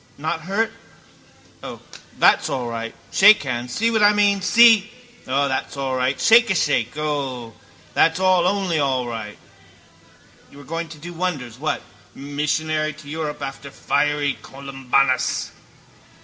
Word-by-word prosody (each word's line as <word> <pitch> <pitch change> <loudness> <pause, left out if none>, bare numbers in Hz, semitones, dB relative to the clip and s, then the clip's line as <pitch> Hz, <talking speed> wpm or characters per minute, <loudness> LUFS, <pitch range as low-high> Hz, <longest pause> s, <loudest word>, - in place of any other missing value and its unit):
Not 160 +3 -3
hurt? 210 +4 -1 0.9
O, - - -8 0.4
that's - - +4
all 125 -2 -3
right. 115 -1 -5 0.2
Shake 210 -1 +6
hands. 120 -2 -4
See 230 +1 +1
what 220 -1 +1
I 205 0 +6
meant, 205 -2 +2
see? 225 -1 +5 0.4
O, 140 +2 +1
that's 135 +1 -3
all 135 -1 -2
right. 130 +1 -1
Shake 230 +1 +5
a 190 - +1
shake. 145 -6 0
O, 135 -6 -3 0.4
that's 165 +2 +3
all 185 -2 +3
only 190 -4 0
all 130 -3 0
right. 110 -3 -6 1.1
You - - -16
were 145 - -12
going 165 +4 -5
to 155 - -11
do 170 +4 -9
wonders, 145 -10 -4
what? 155 +2 -2 0.3
Missionary 155 +2 -2
to 155 0 -15
Europe 150 -1 -5
after 140 +1 -7
fiery 145 0 -1
Columbanus. 135 -1 -1
150 Hz, 145 wpm, -21 LUFS, 135-180 Hz, 1.1 s, Shake